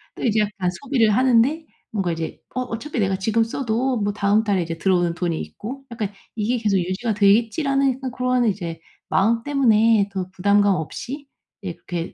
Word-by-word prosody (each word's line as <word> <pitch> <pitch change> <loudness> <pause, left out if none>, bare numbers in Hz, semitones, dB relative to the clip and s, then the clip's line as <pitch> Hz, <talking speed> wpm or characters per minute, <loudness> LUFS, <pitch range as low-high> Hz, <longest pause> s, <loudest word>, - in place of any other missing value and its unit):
또 - - -7
이제 220 -3 +2
약간 200 -3 -1
소비를 255 -6 +2
하는데 260 +5 +3 0.3
뭔가 195 -5 -1
이제 165 -1 -4 0.2
'어 255 - 0
어차피 250 +3 -4
내가 195 -2 +1
지금 220 +4 +1
써도 245 +2 -1
뭐 205 -1 0
다음 205 +1 +2
달에 200 -4 +1
이제 165 0 -5
들어오는 175 -1 +2
돈이 170 -2 -2
있고 270 +6 -8
약간 220 -4 -3 0.2
이게 225 +3 0
계속 210 -4 +1
유지가 185 +6 -1
되겠지.'라는 240 +7 +3
약간 260 -1 -5
고런 250 0 +1
이제 175 -6 -2 0.3
마음 230 +4 +2
때문에 225 -7 +3
더 185 -2 -4
부담감 200 +1 +3
없이 265 - -6 0.4
예 185 -3 -4
그렇게 170 0 -6
215 Hz, 370 characters per minute, -22 LUFS, 190-250 Hz, 0.4 s, 하는데